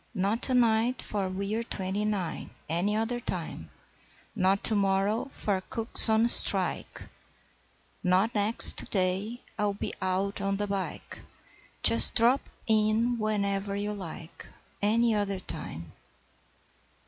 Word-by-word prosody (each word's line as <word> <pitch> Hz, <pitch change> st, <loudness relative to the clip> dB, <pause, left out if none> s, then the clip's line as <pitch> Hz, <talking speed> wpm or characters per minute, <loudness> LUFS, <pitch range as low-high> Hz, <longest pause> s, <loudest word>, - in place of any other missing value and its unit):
'Not 200 Hz, +5 st, -1 dB
to 260 Hz, -, +1 dB
night, 235 Hz, +1 st, +2 dB
for 200 Hz, -3 st, -3 dB
we're 200 Hz, +4 st, -3 dB
twenty 200 Hz, -2 st, -3 dB
nine 195 Hz, -6 st, -4 dB, 0.2 s
Any 175 Hz, +6 st, -1 dB
other 225 Hz, +3 st, -2 dB
time. 240 Hz, -, -6 dB, 0.7 s
Not 195 Hz, -1 st, +1 dB
to -, -, +3 dB
morrow, 200 Hz, +2 st, 0 dB
for 205 Hz, -8 st, -3 dB
cook's 225 Hz, 0 st, +4 dB
on 220 Hz, +1 st, +3 dB
strike, -, -, +3 dB, 1.0 s
Not 190 Hz, +5 st, +1 dB
next 210 Hz, +2 st, +5 dB
day, 195 Hz, +5 st, -1 dB, 0.2 s
I'll 205 Hz, -1 st, -1 dB
be -, -, -5 dB
out 190 Hz, +2 st, -2 dB
on 195 Hz, 0 st, -2 dB
the 205 Hz, -, -2 dB
bike 195 Hz, -5 st, -6 dB, 0.6 s
Just 115 Hz, +1 st, +5 dB
drop 240 Hz, +4 st, +3 dB, 0.2 s
in 220 Hz, +2 st, +1 dB
whenever 200 Hz, -2 st, -2 dB
you 205 Hz, +1 st, -3 dB
like 170 Hz, -4 st, -10 dB, 0.3 s
Any 225 Hz, +3 st, +2 dB
other 200 Hz, -2 st, -2 dB
time!' 85 Hz, -, -7 dB
205 Hz, 125 wpm, -27 LUFS, 190-220 Hz, 1.0 s, next